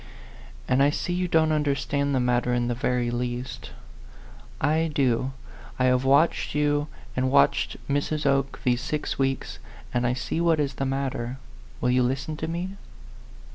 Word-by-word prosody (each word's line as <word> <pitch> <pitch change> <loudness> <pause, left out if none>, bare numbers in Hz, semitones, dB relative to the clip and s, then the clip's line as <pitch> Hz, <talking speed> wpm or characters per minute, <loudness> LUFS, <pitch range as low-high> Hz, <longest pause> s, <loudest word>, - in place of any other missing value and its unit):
And 130 - +3
I 140 - +5
see 175 +4 -2
you 180 0 0
don't 160 -2 +3
understand 140 -1 0
the - - +2
matter 125 0 +1
in 120 0 0
the - - +1
very 120 0 0
least. 120 +1 -4 0.9
I 160 +3 +2
do. 130 -2 +1 0.5
I 125 - +1
have 125 0 +3
watched 140 +3 +3
you 145 0 +1 0.3
and 130 +1 +1
watched 70 - +3
Mrs. 145 +2 -1
Oke 140 0 +1
these 125 -1 +2
six 150 +1 -3
weeks, 135 0 -1 0.3
and 120 0 +1
I 120 - +1
see 130 +6 -2
what 165 -2 +3
is 140 -2 0
the 135 - -2
matter. 130 -2 -2 0.4
Will 125 - +2
you 125 0 +3
listen 135 +5 -1
to 160 - -3
me?" 180 +4 -4
135 Hz, 165 wpm, -26 LUFS, 125-150 Hz, 0.9 s, I